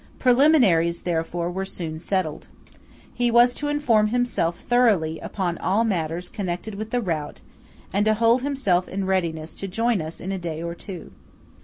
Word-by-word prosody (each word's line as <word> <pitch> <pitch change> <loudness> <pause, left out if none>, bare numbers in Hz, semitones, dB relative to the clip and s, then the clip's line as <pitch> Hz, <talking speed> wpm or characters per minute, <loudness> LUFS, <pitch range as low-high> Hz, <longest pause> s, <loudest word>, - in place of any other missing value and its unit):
Preliminaries, 240 - +4
therefore, 170 0 -2
were 190 +2 -3
soon 165 -4 -5
settled. 180 -3 -2 0.7
He 245 -1 +1
was 240 +1 +5
to 295 - -3
inform 250 -8 +2
himself 215 -7 0
thoroughly 210 -11 +2
upon 180 -4 -3
all 200 +5 +1
matters 175 -4 -2
connected 185 +2 -4
with 215 +2 -5
the 245 +1 0
route, 160 -7 -3 0.5
and 200 +2 +2
to 215 0 +3
hold 230 +3 +3
himself 250 -11 0
in 195 0 -3
readiness 165 -4 -1
to 195 - -6
join 225 +1 0
us 160 +1 -6
in 190 - -5
a 190 - -3
day 165 -2 -5
or 170 0 -3
two. 180 0 -8
190 Hz, 165 wpm, -24 LUFS, 170-230 Hz, 0.7 s, was